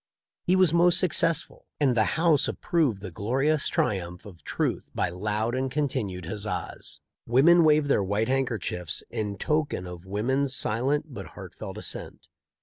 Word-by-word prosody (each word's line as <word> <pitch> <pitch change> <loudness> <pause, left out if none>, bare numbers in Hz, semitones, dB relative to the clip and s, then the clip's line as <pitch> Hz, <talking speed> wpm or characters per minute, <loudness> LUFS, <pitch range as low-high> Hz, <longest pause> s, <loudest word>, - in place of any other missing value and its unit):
He 180 - +2
was 185 -4 +4
most 175 +1 +4
successful, 165 -2 0
and 135 -4 +3
the 110 - +4
house 160 -3 +4
approved 145 - 0
the 95 - -6
glorious 135 - 0
triumph 90 -3 -1
of 95 -5 -13
truth - - -2
by - - +1
loud 105 +5 -2
and 130 +1 -1
continued 110 - -2
huzzas. 105 +4 -4 0.3
Women 165 +8 +6
waved 155 -1 +4
their 140 -8 +2
white 100 +3 0
handkerchiefs 110 -10 -1
in 105 -2 -3
token 150 -10 -1
of 90 -1 -8
wo 100 +2 -2
man's 130 +2 +1
silent 140 +7 0
but 100 -5 -7
heartfelt - - -8
assent. - - -6
125 Hz, 150 wpm, -27 LUFS, 100-150 Hz, 0.3 s, Women